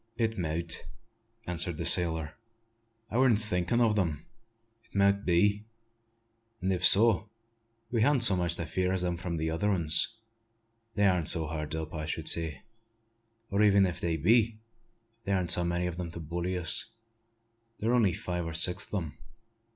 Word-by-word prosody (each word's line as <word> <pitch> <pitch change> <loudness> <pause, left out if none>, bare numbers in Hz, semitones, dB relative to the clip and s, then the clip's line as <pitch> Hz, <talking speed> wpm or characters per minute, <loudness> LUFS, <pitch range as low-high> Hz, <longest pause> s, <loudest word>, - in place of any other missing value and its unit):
"It 115 -1 -1
mout," 85 -2 -2 0.6
answered 85 -1 -2
the - - -4
sailor. 80 -3 +6 0.8
"I 115 - -2
warn't 130 -4 +3
thinkin' 105 +1 -1
o' 115 -2 +2
them. 85 -8 -2 0.6
It - - -26
mout 100 0 +1
be; 100 +4 +1 1.0
an' 95 +1 -2
if 90 -1 -3
so, 105 +2 +6 0.6
we 115 -2 0
han't 130 +1 +2
so 100 -5 +5
much 85 -1 0
to 85 - -5
fear 90 +3 -2
as 95 -1 -2
from 85 -1 -5
t' 80 0 -3
other 80 +6 -2
'uns. 85 +2 0 0.8
They 100 - +1
arn't 90 -4 +2
so 80 -3 +2
hard 75 0 -5
up, 80 -1 -6
I 80 -1 -5
should 80 0 -5
say; 80 -5 -2 0.9
or 100 +1 0
even 100 -2 +4
if 90 -1 -5
they 85 -1 -2
be, 110 +7 +2 0.7
there 100 - 0
arn't 90 -2 +1
so 90 - +2
many 85 +1 -2
o' - - -3
'em 85 0 -7
to 85 - -9
bully 85 +3 -4
us. 90 0 0 0.9
There 110 - -3
were 125 - +2
only 105 -7 +2
five 90 -1 -5
or 80 - -6
six 90 +4 +4
o' 105 - -2
them. 80 -6 -7
90 Hz, 175 wpm, -28 LUFS, 85-100 Hz, 1.0 s, sailor